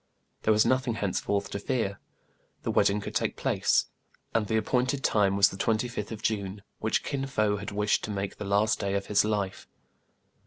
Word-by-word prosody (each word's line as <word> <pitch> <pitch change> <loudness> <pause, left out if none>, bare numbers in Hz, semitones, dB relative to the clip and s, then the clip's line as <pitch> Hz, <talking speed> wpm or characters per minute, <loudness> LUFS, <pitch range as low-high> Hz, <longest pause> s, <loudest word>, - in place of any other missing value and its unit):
There 110 - +2
was 110 0 +4
nothing 130 -2 +1
henceforth 100 -1 -1
to 100 - -3
fear. 100 -3 -1 0.6
The - - -1
wedding 100 +1 +3
could - - -6
take - - 0
place; - - +2 0.5
and 110 -2 +1
the 110 - +1
appointed 125 +4 0
time 100 -2 +3
was 100 0 +6
the 95 - -8
25th 110 0 -1
of 110 -1 -7
June, 100 -2 -2 0.2
which 110 - 0
Kin 135 -1 -2
Fo 105 -6 +1
had 100 - -5
wished 105 +1 +1
to - - -7
make 100 -1 -3
the - - -5
last 100 +2 +2
day 100 0 -1
of 100 0 -1
his 100 0 +3
life. 105 -3 -2
105 Hz, 190 wpm, -28 LUFS, 100-110 Hz, 0.6 s, was